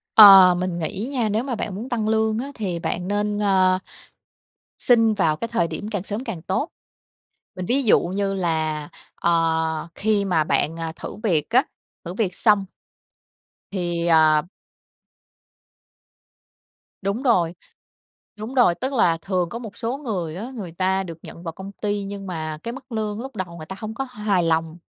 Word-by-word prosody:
Ờ, 195 -4 +10
mình 180 -1 -2
nghĩ 195 +8 -3
nha, 235 -5 0
nếu 220 +4 0
mà 260 -3 -3
bạn 205 -2 -4
muốn 230 +6 -6
tăng 225 -4 -1
lương 220 0 +2
á, 275 +3 -5
thì 185 -6 -3
bạn 180 +2 -3
nên, 205 0 -1
à, 190 -2 +3 1.0
xin 225 -3 +4
vào 165 -7 +2
cái 230 +8 -4
thời 220 -7 +1
điểm 185 +6 -5
càng 205 -4 -2
sớm 210 +5 -5
càng 165 -10 -5
tốt. 190 - -1 0.9
Mình 185 -1 -4
ví 265 +5 +2
dụ 220 - +5
như 195 +2 -2
là, 160 -4 -1 0.3
ờ, 160 -1 +1
khi 205 -1 +1
mà 175 -5 +2
bạn, 150 +3 0
à, 165 -1 -4
thử - - -7
việc 165 -7 +1
á, 255 +4 +4 0.4
thử 175 - -5
việc 190 -4 -1
xong. 210 -3 +3 1.1
Thì, 175 -3 -1
à 155 -2 +5 2.6
Đúng 200 +6 -2
rồi, 180 -10 +3 0.9
đúng 225 +5 -6
rồi. 240 -9 +5
Tức 260 +7 -3
là 170 -10 +3
thường 180 -2 -1
có 235 - -5
một 220 -4 -9
số 240 +3 -2
người 185 - -4
á, 225 +8 -6
người 195 -7 -6
ta 190 +2 +1
được 165 -3 -8
nhận 170 - -10
vào 165 - -4
công 190 +3 -8
ty 205 -1 0
nhưng 195 0 -6
mà 155 -3 -4
cái 235 - -3
mức 260 0 -12
lương 215 -1 -2
lúc 265 0 -8
đầu 180 -4 -5
người 155 - -8
ta 190 - -7
hông 220 0 -5
có 270 - -3
hài 210 -7 0
lòng. 165 0 0
195 Hz, 180 wpm, -23 LUFS, 170-220 Hz, 2.6 s, Ờ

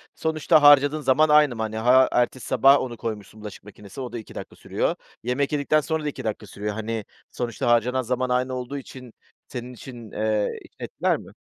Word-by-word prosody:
sonuçta 160 0 +2
harcadığın 145 +1 +6
zaman 150 +3 +3
aynı 150 -4 +5
mı? 110 - -5
Hani, 110 0 -3
ha, 125 +3 +5
ertesi 125 +1 0
sabah 140 +1 +5
onu 120 -2 -5
koymuşsun 110 -1 -6
bulaşık 105 -2 -9
makinesine, 105 +4 -10
o 125 - -6
da - - -3
2 110 - -13
dakika - - -8
sürüyor. - - -2 0.3
Yemek 125 +4 -1
yedikten 150 +1 +2
sonra 160 0 -2
da 150 - -1
2 - - -8
dakika 110 -1 -4
sürüyor, 105 +1 -5
hani, 110 0 -4 0.3
sonuçta 120 -2 -3
harcanan 120 +2 +2
zaman 125 +1 -2
aynı 125 +1 0
olduğu 125 +2 -5
için 130 -3 -11 0.3
senin 125 -2 -7
için, 120 -2 -11
eee, 110 -1 -1 0.2
etkiler - - -1
mi? - - -13
125 Hz, 195 wpm, -24 LUFS, 110-140 Hz, 0.3 s, harcadığın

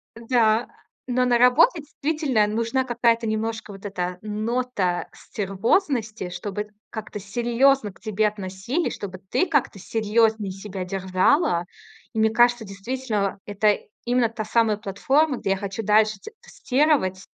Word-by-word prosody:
Да, 230 -1 +2 0.4
но 250 0 +1
на 245 -1 +3
работе, 300 +7 +5
действительно, 290 -6 0
нужна 230 +4 0
какая-то 235 -1 +1
немножко 220 0 -3
вот 195 +1 -11
эта 180 -2 -3
нота 215 -3 -1
стервозности, 215 - -1
чтобы 205 +4 -5 0.2
как-то 215 -1 -6
серьёзно 235 +3 +2
к - - -22
тебе 215 -1 0
относились, 205 - -3
чтобы 185 -2 -7
ты 370 - +2
как-то 290 -10 0
серьёзнее 220 0 +1
себя 195 -1 -6
держала. 185 - +1 0.5
И 220 - -2
мне 220 0 +4
кажется, 240 0 +3
действительно, 205 0 -3
это 205 +1 +2 0.3
именно 240 -1 +2
та 225 -1 -5
самая 225 -3 +2
платформа, 265 +8 +1
где 195 - -2
я 195 - +2
хочу 195 +2 -4
дальше 215 0 +3
т 440 - -10
тестировать 255 -9 0
220 Hz, 135 wpm, -24 LUFS, 200-245 Hz, 0.5 s, работе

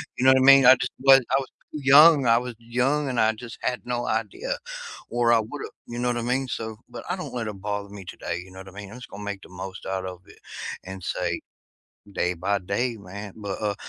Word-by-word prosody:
you 125 - -2
know - - +8
what - - +4
I - - +3
mean? 135 0 +9
I 130 - +10
just 125 0 -3
was 135 0 +7
I - - +4
was 135 - -5 0.2
too 150 - -5
young, 145 +1 +8
I 115 0 +6
was 125 0 -3
young 130 +5 0
and 125 -2 -2
I 110 0 +4
just 115 +1 -9
had 125 - -1
no 120 -1 -2
idea, 110 -2 -2 0.5
or 120 0 +2
I 115 - +6
would've, 125 +7 -5 0.2
you 120 - -6
know 125 0 +1
what 120 - -1
I - - -1
mean? 130 +3 0
So 110 -1 -4
but - - -8
I 180 - 0
don't 180 - -7
let 115 -3 -3
it 100 -3 -7
bother 100 0 -3
me 100 -1 -9
today, 90 0 -5
you 95 - -16
know 95 - -11
what 95 - -10
I - - -10
mean? 100 0 -9
I'm 120 - -9
just 125 - -10
gonna 105 +1 -9
make 100 -1 -5
the - - -14
most 95 +1 -8
out 95 -1 -3
of 90 -1 -7
it - - -17 0.4
and 95 0 -8
say 85 -1 -2 0.7
"Day 90 -2 0
by 100 +4 0
day, 115 +6 -2
man," 100 +1 -8
but, 100 -2 -5
uh, 105 -1 0
115 Hz, 260 wpm, -25 LUFS, 100-125 Hz, 0.7 s, I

